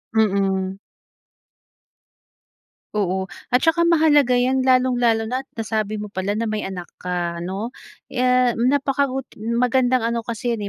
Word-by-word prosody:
Mm. 195 -3 +1 2.2
Oo, 190 -2 0 0.2
at 250 - +4
saka 325 +1 +3
mahalaga 295 -6 +4
'yan 260 +1 +2
lalong-lalo 245 -3 +3
na 250 +4 -2
at 270 - -25
nasabi 215 -1 -2
mo 210 -1 -7
pala 200 +3 -2
na 230 - -1
may 215 -1 -2
anak 185 -2 -5 0.2
ka 175 -1 -3
ano. 195 +7 -4 0.3
Eh, 250 -1 +2
napakabuti 270 0 0
magandang 245 +1 +1
ano 235 - -1
kasi 235 +1 -3
'yon, 220 - -4
230 Hz, 130 wpm, -22 LUFS, 205-255 Hz, 2.2 s, at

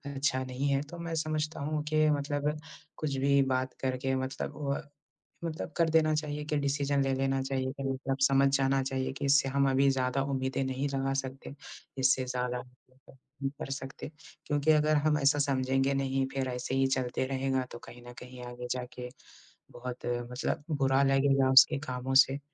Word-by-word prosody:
अच्छा 135 -1 0
नहीं 130 +2 -3
है 140 0 +2
तो 175 - -7
मैं 170 -1 -4
समझता 155 0 -2
हूँ 150 +1 -2
कि 155 0 +4
मतलब 145 0 0 0.5
कुछ 145 -3 -2
भी 140 +1 +3
बात 130 0 -1
करके 130 0 -1
मतलब 130 +2 -4 0.2
अ, 150 - -10 0.6
मतलब 160 -1 -5
कर 165 -1 +3
देना 155 -1 +3
चाहिए 150 -1 -3
कि 150 - +1
डिसीज़न 140 0 0
ले 135 0 0
लेना 135 0 0
चाहिए 130 -1 -2
कि 140 - -8
मतलब 135 0 -2
समझ 135 0 +4
जाना 135 0 +2
चाहिए 130 0 -2
कि 135 +1 -6
इससे 140 -1 +4
हम 140 0 +2
अभी 135 +1 +3
ज़्यादा 130 0 0
उम्मीदें 135 -1 -1
नहीं 130 +2 -2
लगा 135 0 0
सकते 135 +1 -8 0.4
इससे 130 0 +3
ज़्यादा 125 -1 -2 0.8
नहीं 135 - +1
कर - - -6
सकते, 135 0 -6 0.4
क्योंकि 145 +1 +1
अगर 155 0 +3
हम 150 -1 +3
ऐसा 145 +1 +3
समझेंगे 135 -1 +1
नहीं 135 0 0
फिर 135 -1 -1
ऐसे 125 +1 -3
ही 135 0 +3
चलते 130 -1 -1
रहेगा, 135 0 0
तो - - -8
कहीं 120 +1 -13
न - - -8
कहीं 125 0 -10
आगे 125 0 -7
जाके 125 0 -4 0.6
बहुत 125 0 -7 0.3
मतलब 130 +3 -2
बुरा 135 -2 +2
लगेगा 135 -1 +3
उसके 140 +2 +7
कामों 125 +1 -3
से। 135 +1 -5
135 Hz, 180 wpm, -30 LUFS, 130-145 Hz, 0.8 s, उसके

